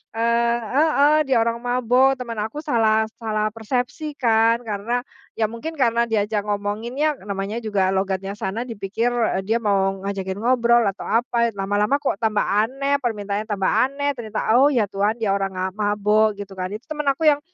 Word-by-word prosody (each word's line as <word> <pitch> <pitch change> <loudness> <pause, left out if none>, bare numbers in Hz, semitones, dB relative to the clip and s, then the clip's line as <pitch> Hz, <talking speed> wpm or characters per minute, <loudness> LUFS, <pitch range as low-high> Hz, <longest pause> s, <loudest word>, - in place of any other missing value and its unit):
eee 235 +1 +2 0.2
heeh, 300 0 +4
dia 260 -3 +3
orang 230 0 -1
mabuk. 250 +2 +2
Teman 235 -4 -6
aku 220 +9 -4
salah 220 -6 +2 0.2
salah 215 -2 -1
persepsi 250 +7 -3
kan 230 -1 +2
karena 230 +3 -2 0.3
ya 220 - +2
mungkin 310 +8 -6
karena 235 -4 +2
diajak 210 -1 -1
ngomonginnya 225 +9 -1
namanya 200 +3 -3
juga 200 -4 0
logatnya 195 0 -1
sana, 205 +3 -3
dipikir, 230 0 -2
eee, 225 -5 0
dia 225 - +1
mau 195 -2 +1
ngajakin 190 -1 -3
ngobrol 235 -1 +3
atau 195 - -7
apa, 235 +1 +1
eh, - - -25
lama-lama 205 +7 +1
kok 270 - 0
tambah 215 -2 +1
aneh, 265 +7 +1
permintaannya 210 -3 -2
tambah 195 -2 0
aneh, 285 +2 +1
ternyata, 220 -1 -2
"Oh, 275 +2 +6
ya 240 -6 +2
Tuhan 205 +4 0
dia 205 -3 +1
orang, 195 -1 -1
ah, 185 +1 -1
mabuk." 210 +1 +2
Gitu 200 -1 -7
kan. 185 0 -3
Itu 215 +5 -8
teman 300 -2 -1
aku 310 +3 0
yang, 290 - +2
225 Hz, 175 wpm, -22 LUFS, 205-245 Hz, 0.3 s, Oh